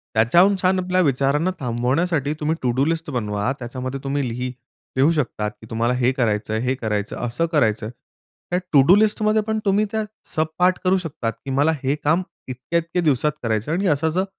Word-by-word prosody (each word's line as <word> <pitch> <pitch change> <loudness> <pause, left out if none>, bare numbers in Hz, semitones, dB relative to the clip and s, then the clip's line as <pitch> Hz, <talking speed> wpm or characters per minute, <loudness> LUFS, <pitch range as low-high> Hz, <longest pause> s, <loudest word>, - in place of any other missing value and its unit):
त्याच्याहून 170 - +5
छान 185 +1 +3
आपल्या 185 0 +1
विचारांना 145 +2 +2
थांबवण्यासाठी 140 +5 0
तुम्ही 155 +2 0
टू-डू 125 +2 +1
लिस्ट 165 0 -2
बनवा, 105 -1 -1
त्याच्यामध्ये 130 +2 -5
तुम्ही 135 -2 -1
लिह 125 +2 -3 0.5
लिहू 140 +5 +4
शकतात 115 -8 -1
की 110 - -12
तुम्हाला 115 +2 0
हे 125 0 +2
करायचंय, 110 -3 -1
हे 125 +2 0
करायचं, 105 -5 -3
असं 125 +8 0
करायचं. 110 -7 +1 0.6
त्या 180 - +1
टू-डू 145 +6 +7
लिस्टमध्ये 215 0 +2
पण 220 0 0
तुम्ही 205 +1 +3
त्या 220 -1 0 0.3
सबपार्ट 175 +3 +1
करू 185 +1 +4
शकता 155 -9 -3
की 115 +5 -10
मला 145 +4 +2
हे 135 +2 +1
काम 165 +5 +3 0.3
इतक्या-इतक्या 165 +7 -2
दिवसात 150 -1 +2
करायचं 110 +5 -1
आणि 190 +3 0
असं 155 +1 +2
असं 185 +4 0
140 Hz, 170 wpm, -22 LUFS, 120-170 Hz, 0.6 s, टू-डू